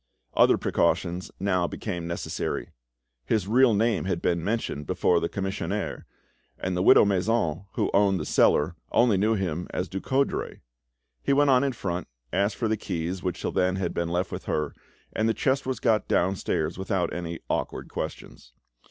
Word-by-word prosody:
Other - - +5
precautions 90 +1 0
now 90 -3 +1
became 90 -5 -4
necessary. 85 - -3 0.5
His 100 - 0
real 120 +1 +5
name 110 -1 +1
had 95 -3 -1
been 85 -1 0
mentioned 100 -8 -2
before 90 -1 +2
the 85 - -2
commissionaire, 95 -1 -3 0.5
and 90 -1 -2
the 90 - 0
widow 95 - +7
Masson, 95 -3 0
who - - 0
owned 100 -2 +3
the - - -4
cellar, 80 +4 +3 0.2
only 120 -3 +4
knew 105 +4 +2
him 90 -3 -2
as 90 - -2
Ducoudray. 130 +9 -1 0.6
He - - +1
went 145 0 +4
on 130 +1 +5
in 140 -2 0
front, 90 -5 -3 0.3
asked 100 +3 +1
for 115 - -1
the 110 0 0
keys, 90 0 -3
which 90 -2 -3
till - - -2
then 90 0 +1
had 95 -3 -2
been 85 0 -1
left 90 +1 -1
with - - -6
her, 75 -1 -1 0.4
and 110 +1 +1
the 110 - +1
chest 135 0 0
was 130 - -2
got 110 -2 +2
downstairs 90 -2 0
without 95 -3 -1
any 85 -1 -4
awkward - - -2
questions. - - -7
95 Hz, 170 wpm, -26 LUFS, 85-110 Hz, 0.6 s, widow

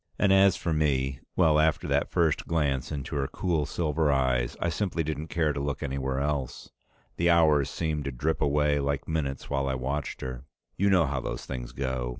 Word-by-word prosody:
And 95 - +4
as 95 -1 +6
for 85 - -2
me 65 -3 0 0.2
well, 80 -4 +4
after 80 0 +2
that - - +1
first 80 -3 +1
glance 75 -6 0
into 70 -2 -4
her 70 -1 0
cool 80 -4 -1
silver 80 -2 0
eyes, 65 -3 +1
I 85 - 0
simply 85 0 -1
didn't 80 0 -4
care 80 -3 0
to 70 - -3
look 70 +1 -3
anywhere 65 -1 -2
else. 70 -3 -3 0.5
The 85 +1 +2
hours 75 -5 +4
seemed 75 -2 -2
to 70 - -2
drip 75 +6 -1
away 75 0 +2
like 70 0 -2
minutes 70 -5 -3
while 70 -1 0
I 65 - 0
watched 70 +2 -3
her. 65 -1 -5 0.3
You 100 +2 +2
know 90 -4 +4
how 70 -2 -2
those - - -5
things 60 -2 -6
go. 65 -2 -2
75 Hz, 195 wpm, -27 LUFS, 65-80 Hz, 0.5 s, as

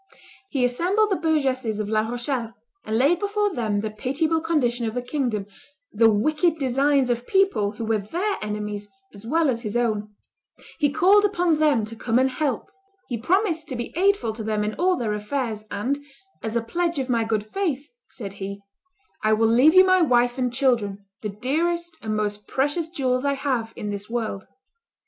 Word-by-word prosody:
He 265 -3 0
assembled 370 - +1
the - - +3
burgesses 265 - 0
of 210 - -2
La 215 0 +2
Rochelle, 240 -1 -3 0.3
and 220 +1 -1
laid 290 +8 +3
before 410 -1 0
them 215 -4 -1
the 215 0 -3
pitiable 310 +9 0
condition 250 -8 0
of 220 - -4
the 245 - -1
kingdom, 245 -6 -2 0.5
the 225 -1 +5
wicked 305 - +2
designs 270 -1 +2
of 240 +1 -3
people 385 - +2
who 225 +2 -5
were 220 -1 +1
their 355 - -2
enemies 210 -1 -4 0.2
as 205 +2 -11
well 325 +4 +2
as 235 -3 0
his 215 -1 -2
own: 215 -3 -1 0.6
he 295 -2 +3
called 385 +8 +5
upon 355 -6 +2
them 290 -8 +3
to 225 +2 -9
come 225 +1 0
and 260 +1 +3
help; 285 - -2 0.4
he 245 - -1
promised 335 - +1
to 260 - -4
be 235 0 -5
aidful 370 - +2
to 220 - -6
them 215 -1 -1
in 210 +1 -2
all 365 +6 +2
their 220 -3 -1
affairs, 215 0 -3
and, 275 +8 -2 0.4
"as 220 0 -4
a 235 - +1
pledge 340 +7 -1
of 265 -2 -1
my 235 -3 +1
good 220 -2 -1
faith," 295 - -2 0.2
said 200 -5 -7
he, 200 +1 -5 0.6
"I 215 0 +4
will 225 +1 +3
leave 260 +8 +5
you 370 0 +9
my 370 -1 +4
wife 245 -4 +3
and 250 -1 0
children, 230 -6 0 0.2
the 210 - -3
dearest 325 +10 -1
and 215 -1 -2
most 210 -1 -3
precious 295 +5 0
jewels 255 -6 0
I 280 0 +2
have 260 -5 -1
in 210 - -4
this 205 +1 -6
world." 220 -5 -3
250 Hz, 190 wpm, -24 LUFS, 220-315 Hz, 0.6 s, you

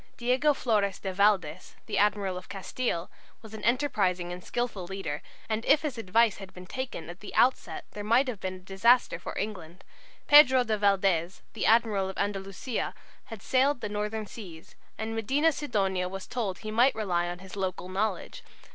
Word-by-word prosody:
Diego 255 +5 +2
Flores 205 -7 +1
de 190 -1 -5
Valdes, 190 -4 +1
the - - -1
admiral 205 -2 +1
of 180 0 -8
Castille, 195 -2 -3 0.3
was 220 -1 -12
an 220 - -8
enterprising 195 -9 +1
and 180 0 -9
skilful 240 -6 -3
leader, 190 -6 -4 0.3
and 220 0 -1
if 295 +2 +4
his 295 -5 -2
advice 225 0 +2
had 195 -1 -10
been 180 0 -10
taken 260 -5 -5
at 175 +2 -9
the 205 - -9
outset 220 -10 +2
there 205 - -6
might 235 +6 +3
have 235 -6 -4
been 185 -1 -4
a - - -11
disaster 195 +7 +3
for - - -7
England. 185 -4 -5 0.4
Pedro 265 -4 +7
de 220 -2 0
Valdes, 195 -4 +1
the 220 - -1
admiral 215 -4 +3
of 190 - -7
Andalusia, 200 +4 -3 0.3
had 225 -3 -10
sailed 265 0 +2
the - - -3
northern 210 +1 -3
seas, 180 -7 -11 0.2
and 220 0 -4
Medina 270 +9 +2
Sidonia 195 -11 -1
was 195 0 -6
told 210 -7 -3
he 215 - -6
might 240 +5 +4
rely 180 -5 0
on 175 - -5
his 190 +1 -11
local 185 -2 -3
knowledge. 190 0 -2
205 Hz, 180 wpm, -28 LUFS, 185-235 Hz, 0.4 s, Pedro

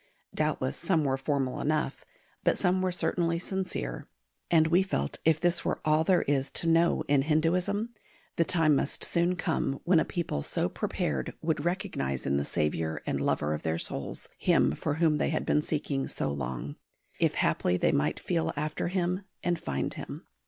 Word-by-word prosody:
Doubtless 65 - -1
some 165 -5 +1
were 135 -2 +1
formal 135 -1 -1
enough, 150 -2 -1 0.4
but - - +3
some 185 +1 +2
were 185 -1 +1
certainly 170 -1 0
sincere; 185 - -4 0.4
and 160 -2 +5
we 170 +4 +4
felt 70 - -2
if 160 -1 +4
this 175 0 +2
were - - -1
all 155 +1 +4
there 180 +2 +3
is 140 -1 +1
to 170 - -1
know 165 -1 +3
in 140 -1 +4
Hinduism, 175 +8 +1 0.5
the 170 - +3
time 160 -3 +4
must 140 - 0
soon 175 +1 +2
come 160 -6 -1
when 175 -2 +4
a - - +3
people 170 - -2
so - - -1
prepared 70 -4 -2
would 155 -2 0
recognise 175 - -2
in 70 +1 +1
the 70 - -1
Saviour 80 +1 -1
and - - -1
Lover 75 +1 +1
of 75 - -3
their 80 0 -1
souls, - - -4
Him - - +3
for 145 - -2
whom 160 -2 +2
they - - +1
had 155 - -1
been 150 - +3
seeking 145 -3 -2
so 75 - -2
long, 70 0 -4 0.4
"if - - +2
haply 90 - +1
they - - +2
might 75 +1 +1
feel 170 -3 -1
after 150 +3 -2
Him 180 +1 -1 0.2
and 175 -1 0
find 70 -1 -2
Him." - - -8
155 Hz, 180 wpm, -29 LUFS, -, 0.5 s, and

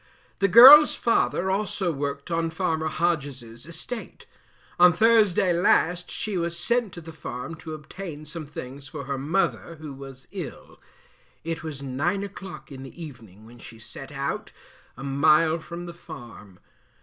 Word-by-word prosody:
The 195 - +3
girl's 265 +9 +10
father 190 -5 +1
also 195 -2 0
worked 140 +1 -4
on 165 0 0
farmer 160 -1 -1
Hodges's 145 -7 -3
estate. 220 +8 -8 0.5
On 180 0 +8
Thursday 205 -2 +3
last 175 0 +2
she 205 -4 -3
was 170 0 -3
sent 235 +1 0
to 170 - -8
the 165 0 -11
farm 125 -1 -7
to 160 0 -7
obtain 155 0 -9
some 155 0 -8
things 135 -1 -9
for 140 - -7
her 135 0 -4
mother, 165 +3 -1
who 155 -2 -9
was 135 -1 -11
ill; 180 -9 -9 0.6
it 165 0 -4
was 150 -4 -7
9 155 +9 -1
o'clock 195 -4 -9
in 135 -1 -9
the 135 +5 -11
evening 115 - -11
when 120 +1 -15
she 115 - -12
set 110 +5 -11
out, 140 0 -4 0.5
a 135 - -8
mile 155 +4 +3
from 170 +2 -8
the 170 - -8
farm. 120 - -12
160 Hz, 155 wpm, -25 LUFS, 140-180 Hz, 0.6 s, girl's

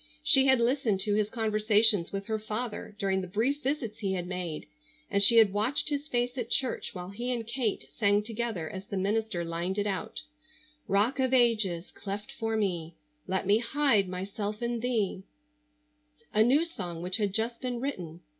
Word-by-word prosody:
She 270 0 +6
had 265 -2 +5
listened 235 -4 +1
to 205 +1 +1
his 210 0 +1
conversations 215 -3 +3
with 195 0 -4
her 220 0 -1
father 215 0 -5
during 190 -2 0
the 185 - -6
brief 235 +10 0
visits 265 -6 -3
he 195 -3 -1
had 180 -2 -3
made, 180 -4 -5 0.5
and 200 -1 +2
she 230 +4 +7
had 215 -4 +6
watched 235 +9 +1
his 290 0 -2
face 245 -1 -1
at 235 -1 -4
church 255 -4 0
while 180 0 -6
he 240 +5 -3
and 235 -2 -2
Kate 230 -3 -2
sang 205 -2 +2
together 220 -6 -3
as 190 +4 -8
the 200 - -4
minister 200 -2 -1
lined 170 +3 -3
it 205 - 0
out: 210 +7 -4 0.6
"Rock 210 +8 +1
of 260 0 +2
Ages 215 -8 +2
cleft 205 +1 -6
for 225 0 -2
me, 170 -6 -2 0.3
Let 190 +1 -1
me 205 +3 +4
hide 235 -6 +2
myself 205 +4 -4
in 235 0 -1
Thee," 225 -6 -1 1.1
a 215 - +4
new 270 +8 +4
song 175 - -6
which 180 +3 0
had 205 -3 0
just 225 +3 -1
been 250 -2 -3
written. 175 - -5
215 Hz, 185 wpm, -29 LUFS, 195-240 Hz, 1.1 s, she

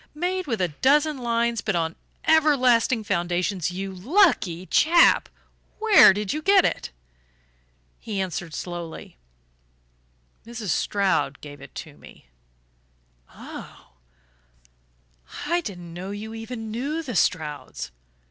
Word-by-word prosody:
Made 360 +3 -2
with 230 -6 -2
a 180 - +1
dozen 285 - +2
lines 235 -1 0
but 215 - -1
on 165 -1 -1 0.3
everlasting 255 -7 +3
foundations. 180 -1 -1
You 190 +2 -5
lucky 190 - +2
chap, 335 - +4 0.5
where 435 - +7
did 205 0 -2
you 305 - -3
get 390 +2 +5
it?" - - -2 1.1
He 210 -3 -5
answered 175 -3 -4
slowly: 170 - -7 1.2
"Mrs. 230 -3 -7
Stroud 200 +1 0
gave 145 -1 -11
it 140 - -13
to 150 -3 -9
me." - - -16 1.0
"Ah - - -11 1.5
I 345 +3 +1
didn't 175 - -8
know 180 +3 -7
you 210 +2 -6
even 225 0 -7
knew 285 +8 -3
the 250 -7 -6
Strouds. 150 - -1
215 Hz, 115 wpm, -24 LUFS, 175-280 Hz, 1.5 s, where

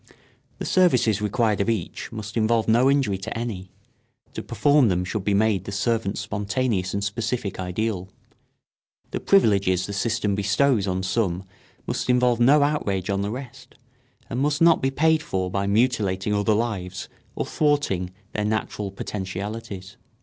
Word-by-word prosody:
The - - -5
services 125 - +3
required 105 0 +1
of 100 - 0
each 110 -7 -3
must 105 -1 -7
involve 115 0 +2
no 120 +4 +4
injury 135 -9 +1
to 95 - -5
any; 105 -6 -5 0.6
to - - -4
perform 145 -3 +3
them 90 -2 0
should 100 +2 -3
be 100 0 +1
made 100 -3 +2
the - - -5
servant's 105 0 -1
spontaneous 105 -2 -1
and 100 - -1
specific 110 0 -3
ideal. 95 +1 -2 1.0
The - - -2
privileges 100 - +3
the 100 - -6
system 105 0 0
bestows 105 +2 +2
on 95 0 -1
some 95 -2 0 0.4
must - - -3
involve 125 -1 +3
no 140 +5 +5
outrage 100 -11 -1
on 100 0 0
the 100 - -2
rest, 130 +2 -8 0.5
and 120 - -3
must 145 +2 +1
not 165 -1 +5
be 135 - +2
paid 160 +3 +2
for 95 -8 -2
by 100 +1 -1
mutilating 105 -3 +1
other 105 +1 +2
lives 95 -5 -3 0.3
or - - -2
thwarting 145 - 0 0.2
their 105 - -1
natural 105 -1 -2
potentialities. 100 0 -6
105 Hz, 155 wpm, -24 LUFS, 95-120 Hz, 1.0 s, no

